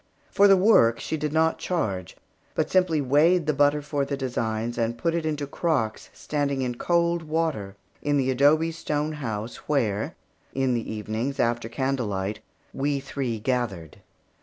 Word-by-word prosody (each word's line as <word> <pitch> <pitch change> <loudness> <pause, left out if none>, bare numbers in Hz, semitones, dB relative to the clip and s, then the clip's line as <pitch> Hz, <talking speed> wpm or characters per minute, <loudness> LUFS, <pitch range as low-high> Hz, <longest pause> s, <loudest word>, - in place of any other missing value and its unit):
For 200 0 +6
the 195 -1 +7
work, 180 - +5
she - - -3
did 150 -1 -2
not 160 +1 +2
charge, 95 - -2 0.4
but - - 0
simply 180 -5 +3
weighed 150 +6 +3
the 155 - +1
butter 145 +1 +3
for 145 -1 -1
the 140 0 -3
designs 115 -3 -2
and 115 0 0
put 165 +4 0
it 165 -2 -1
into 150 -2 -2
crocks 140 -7 -1
standing 140 -3 -2
in 125 -1 -1
cold 170 +5 +1
water 155 -11 -2 0.3
in 145 0 +1
the 130 -1 +1
adobe 150 +5 +3
store 150 -2 -2
house 115 -6 -4
where, 115 -8 0 0.4
in 135 -1 +1
the 115 -2 -2
evenings, 110 +5 -3
after 120 -1 0
candle 130 0 -1
light, 100 +1 -3 0.3
we 140 +1 0
three 135 -4 -3
gathered. 105 - -2
140 Hz, 160 wpm, -25 LUFS, 115-155 Hz, 0.4 s, the